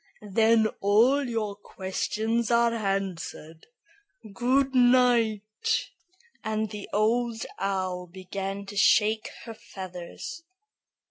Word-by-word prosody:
"Then 220 +2 +4
all 235 +8 +4
your 215 -3 -2
questions 215 +4 -2
are 235 0 +3
answered. 195 -6 -4 0.7
Good 260 +4 +2
night;" 240 -4 +2 0.5
and 220 0 -2
the 210 -2 -7
Old 225 +2 +1
Owl 185 -2 -2
began 195 +2 -5
to 200 +1 -9
shake 215 +1 +3 0.2
her 230 - -7
feathers. 185 - -8
215 Hz, 90 wpm, -27 LUFS, 195-235 Hz, 0.7 s, Then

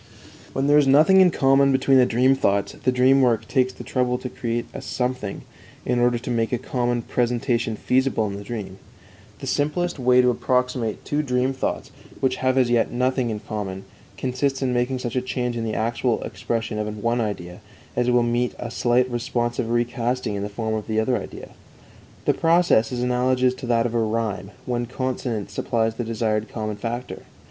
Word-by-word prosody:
When 135 - 0
there 145 +1 +5
is 145 - +3
nothing 155 +8 +6
in 185 - +6
common 135 -2 +4
between 135 0 +4
the 125 - +5
dream 125 +3 +3
thoughts, 100 -6 +1
the 130 - -1
dream 130 +2 +4
work 120 -4 +2
takes 130 -2 +1
the - - -10
trouble 125 -1 0
to 125 - -6
create 120 -1 -3
a - - -6
something, 125 -5 -3 0.4
in 125 0 +1
order 120 0 +3
to 125 +1 -5
make 115 -1 0
a 125 - +1
common 120 0 -1
presentation 120 -1 0
feasible 130 0 +1
in 100 -1 -4
the 100 - -7
dream. 100 -4 -6 0.6
The - - -5
simplest 165 +3 -1
way 125 0 +4
to 125 - +4
approximate 125 -3 -1
two 150 +1 0
dream 130 -1 0
thoughts, 130 - -3 0.3
which 130 -1 +1
have 130 0 +1
as 125 -2 +3
yet 120 -1 +3
nothing 125 0 0
in 105 -2 -4
common, 100 -3 -5 0.3
consists 135 +1 -1
in 125 -1 0
making 125 +2 0
such 125 -1 -4
a 125 - +2
change 125 -1 -2
in 115 - -2
the 110 - -2
actual 115 +1 0
expression 115 -2 -3
of 105 0 -4
one 120 +1 +1
idea 90 -4 -5 0.3
as 125 0 +1
will 120 -1 +4
meet 120 +1 0
a 120 - -6
slight 125 +2 +2
responsive 120 -1 -2
recasting 120 0 -1
in 100 - -3
the 100 - -3
form 110 +1 -3
of 110 -1 -3
the 110 -1 0
other 125 +3 +1
idea. - - -9 0.8
The - - +4
process 165 -9 +3
is 125 -1 -2
analogous 125 +1 +2
to 130 -1 -8
that 115 -1 +2
of 120 - -2
rhyme, 110 -4 -1 0.2
when 120 -1 -2
consonance 125 -5 -3
supplies 115 +2 0
the 120 - -4
desired 110 -1 -1
common 110 -2 -4
factor. 120 +3 -5
120 Hz, 190 wpm, -23 LUFS, 115-130 Hz, 0.8 s, nothing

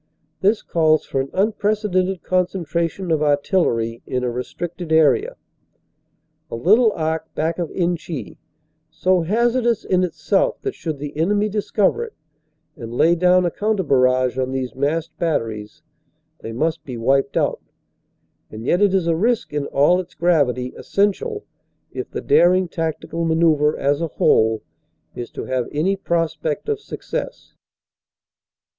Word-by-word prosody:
This 205 +3 +2
calls 155 -2 +2
for 135 - -1
an 135 - -5
unprecedented 200 -3 0
con 185 -1 +2
centration 170 0 -2
of 155 - 0
artillery 145 - +1
in 125 -1 -2
a 125 - 0
restricted 160 +7 -5
area, 150 -6 +3 1.1
a - - -5
little 215 - +4
arc 160 0 -2
back 160 +2 -1
of 170 -3 -2
Inchy, 170 - -3 0.5
so 185 -1 +1
hazardous 235 +5 +1
in 185 0 +2
itself - - 0
that 405 - -2
should 160 -3 -5
the 145 +1 -7
enemy 205 +7 +1
discover 210 - 0
it, 460 - -9 0.6
and 115 -1 -8
lay 160 +8 +3
down 180 +1 +4
a 175 - 0
counter 210 0 0
barrage 130 -3 +2
on 130 0 -1
these 130 -3 -3
massed 155 +4 -2
batteries, 115 -4 -2 0.6
they 115 - -7
must 155 +8 -1
be 125 -3 -7
wiped 135 +4 +1
out; - - 0 0.9
and 110 +2 -8
yet 175 +8 +2
it 200 -2 +4
is 185 -3 +1
a 165 -1 +2
risk 225 +1 0
in 145 -1 -2
all 150 +6 +3
its 180 -1 -8
gravity 140 -7 +1
essential 310 - -1 0.5
if - - -5
the - - -5
daring 185 +1 +4
tactical 165 0 -3
manoeuvre 160 -2 +2
as 140 +2 0
a 165 - 0
whole 110 - +2 0.5
is 120 - -6
to - - -7
have 130 -2 -1
any 170 +7 +1
pros 170 -4 -1
pect 155 - -3
of 430 -1 0
success. - - -6
165 Hz, 150 wpm, -21 LUFS, 140-185 Hz, 1.1 s, little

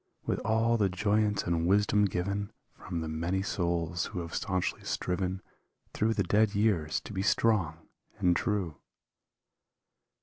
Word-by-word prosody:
With - - 0
all 115 +2 +2
the 100 -3 +2
joyance 105 +1 +1
and 85 -1 0
wisdom 105 +2 +4
given 100 +2 -2 0.2
From 85 -3 -5
the 80 - -3
many 85 +5 -1
souls 85 -3 -1
who 90 -4 -4
have 85 0 -7
stanchly 95 -3 -1
striven 95 +1 -2 0.5
Through 110 +1 +1
the 100 - +2
dead 105 +3 +2
years 100 -8 +1
to - - -9
be 95 - -1
strong 95 -6 +1 0.3
and 90 -4 +3
true. 95 - -1
95 Hz, 140 wpm, -30 LUFS, 85-105 Hz, 0.5 s, wisdom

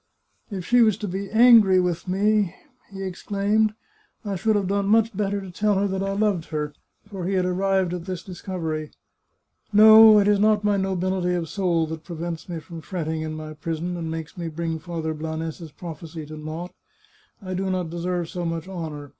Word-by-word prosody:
" - - -44
If 190 -4 -5
she 245 +3 +4
was 215 -3 +4
to 210 - -4
be 195 +2 -4
angry 220 -4 +7
with 180 0 -1
me," 200 0 +1 0.4
he 195 0 -6
exclaimed, 205 +3 0 0.3
" 420 - -38
I 200 -1 -2
should 215 +4 +1
have 200 -2 0
done 200 0 0
much 225 0 +3
better 200 0 -1
to 190 -2 -8
tell 210 +3 +1
her 200 +1 +1
that 190 0 -2
I 195 0 -1
loved 200 -5 0
her," 150 -2 -3 0.3
for 190 -4 -5
he 195 - -1
had 185 -1 +2
arrived 190 0 +1
at 175 -1 -5
this 185 -2 -5
discovery. 165 -5 -4 0.4
" - - -46
No, 220 +1 +9
it 205 -1 +4
is 205 -1 +4
not 210 0 +3
my 205 -1 +2
nobility 185 -1 0
of 165 -3 -3
soul 175 -5 +1
that 160 0 -7
prevents 170 0 -6
me 170 -2 -4
from 165 +2 -10
fretting 160 -3 -3
in 155 0 -4
my 155 0 -7
prison, 165 +3 -4
and 165 -2 -4
makes 160 -1 -6
me 170 - -3
bring 165 0 -3
Father 160 -1 -4
Blanes's 160 +1 -5
prophecy 160 -1 -8
to 155 +1 -9
naught. 155 +3 -6 0.7
I 185 -3 -6
do 190 +1 -2
not 180 -3 -2
deserve 175 0 -2
so 175 +1 -5
much 165 0 -3
honour. 160 -6 -6
180 Hz, 205 wpm, -24 LUFS, 165-200 Hz, 0.7 s, No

